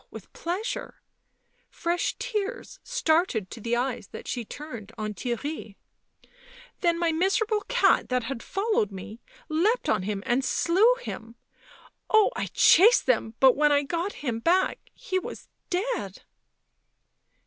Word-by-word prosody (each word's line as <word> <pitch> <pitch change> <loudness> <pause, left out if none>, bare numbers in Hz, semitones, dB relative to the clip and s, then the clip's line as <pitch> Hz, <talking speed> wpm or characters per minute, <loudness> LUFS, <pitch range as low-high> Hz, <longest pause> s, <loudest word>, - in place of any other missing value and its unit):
with - - -12
pleasure 420 +8 -4 0.3
" - - -48 0.2
— - - -39
fresh 340 +1 -1
tears 450 -1 -4
started 325 - +1
to 230 - -8
the 235 +2 0
eyes 250 +1 -2
that - - -10
she 245 - -3
turned 235 -4 -9
on 215 -1 -3
Theirry 240 -1 -4 0.3
— - - -29
" - - -21
then 340 -2 +2
my 335 -1 +1
miserable 415 +6 +1
cat - - +3
that 250 -1 0
had 230 0 -5
followed 395 - 0
me 195 +4 -9 0.3
leapt 365 +10 +1
on 215 - +2
him 200 +1 -3
— - - -24
and 250 +3 +1
slew 390 - +3
him. 230 - -7 0.7
Oh, 435 -1 +5
I - - -2
chased 425 +9 +6
them, 225 -3 +1
but 265 -1 +6
when 295 +1 +3
I 285 0 +3
got 340 +7 -2
him 230 -3 -1
back 360 +9 +2 0.2
he 375 0 -2
was 470 +5 -9 0.2
dead." 360 - -2
320 Hz, 155 wpm, -26 LUFS, -, 0.7 s, chased